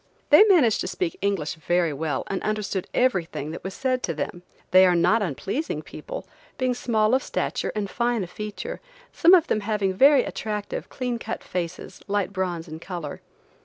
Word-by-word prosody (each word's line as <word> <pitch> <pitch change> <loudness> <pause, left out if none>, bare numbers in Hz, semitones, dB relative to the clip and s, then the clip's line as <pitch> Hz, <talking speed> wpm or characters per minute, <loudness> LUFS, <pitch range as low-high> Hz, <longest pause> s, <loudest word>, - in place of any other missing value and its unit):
They 300 +8 +10
managed 315 - +4
to - - -2
speak 365 -1 -2
English 190 -7 0
very 170 0 0
well 155 +1 -2
and 195 - -3
understood 210 -3 -2
everything 175 - 0
that 165 - -8
was 190 0 -5
said 255 -1 0
to 165 - -2
them. 175 +3 -4 0.3
They 185 +1 +8
are 180 - +3
not 180 +7 +3
unpleasing 200 - -3
people, - - -8 0.3
being 255 -1 +1
small 225 -2 +1
of 260 - +4
stature - - -2
and 210 -2 -1
fine 235 0 0
of 180 - -8
feature, 210 - -6 0.3
some 350 +3 +7
of 335 -3 +4
them 215 - 0
having 205 -2 0
very 270 +5 +6
attractive, 210 -1 -4
clean 250 -2 -3
cut - - -5
faces, 180 0 -5
light 200 -1 -1
bronze 180 -3 -2
in 155 0 -8
color. 170 -4 -6
205 Hz, 180 wpm, -25 LUFS, 175-250 Hz, 0.3 s, They